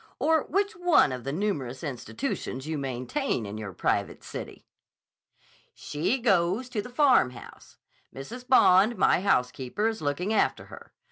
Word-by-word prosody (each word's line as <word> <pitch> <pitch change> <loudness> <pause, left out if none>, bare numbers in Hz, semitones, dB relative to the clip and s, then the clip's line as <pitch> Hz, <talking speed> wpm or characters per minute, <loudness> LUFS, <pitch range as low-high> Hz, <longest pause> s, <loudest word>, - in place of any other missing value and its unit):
Or 320 -2 +2
which 400 +4 -1
one 350 - +4
of 125 -1 -6
the 135 - -2
numerous 145 -8 -3
institutions 125 0 -4
you 160 0 -3
maintain 130 - -2
in 105 +2 -6
your 105 -3 -6
private - - -2
city?" - - -8 1.1
"She 150 - -1
goes 200 +1 +1
to 220 -4 -2
the 245 - -10
Farmhouse. 245 - +1 0.3
Mrs. 240 - -9
Bond, 215 -3 +5
my 185 - +3
housekeeper, 130 - 0
is 225 -1 -3
looking 155 +8 -1
after - - +1
her. - - -13
180 Hz, 140 wpm, -27 LUFS, -, 1.1 s, Bond